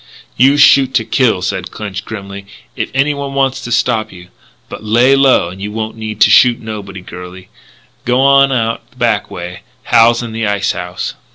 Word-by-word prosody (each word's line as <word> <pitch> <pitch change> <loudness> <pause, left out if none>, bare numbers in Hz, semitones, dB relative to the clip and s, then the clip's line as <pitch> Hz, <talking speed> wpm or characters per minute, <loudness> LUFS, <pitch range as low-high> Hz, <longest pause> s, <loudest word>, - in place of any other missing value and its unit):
"You 135 +3 +4
shoot 135 -2 +5
to 115 - +1
kill," 110 -8 +1
said 95 -1 -3
Clinch 105 -1 -7
grimly, 100 -2 -8 0.3
"if - - -3
anyone 140 0 -1
wants 135 -1 0
to 120 - -7
stop 110 -1 0
you. 90 -1 -14 0.4
But - - -9
lay 120 +5 +3
low 135 -10 +3
and 95 +2 -11
you 105 +1 -5
won't 110 +1 -5
need 110 -1 -7
to - - +6
shoot 125 -1 +5
nobody, 105 -4 -8
girlie. 90 +1 -11 0.6
G'wan 135 +2 +4
out 115 -3 -1
the - - -29
back - - 0
way; 90 0 -8 0.2
Hal's 120 +1 +3
in 115 - -6
the 110 -1 -2
ice 100 -1 0
house." 90 0 -5
110 Hz, 180 wpm, -14 LUFS, 100-130 Hz, 0.6 s, to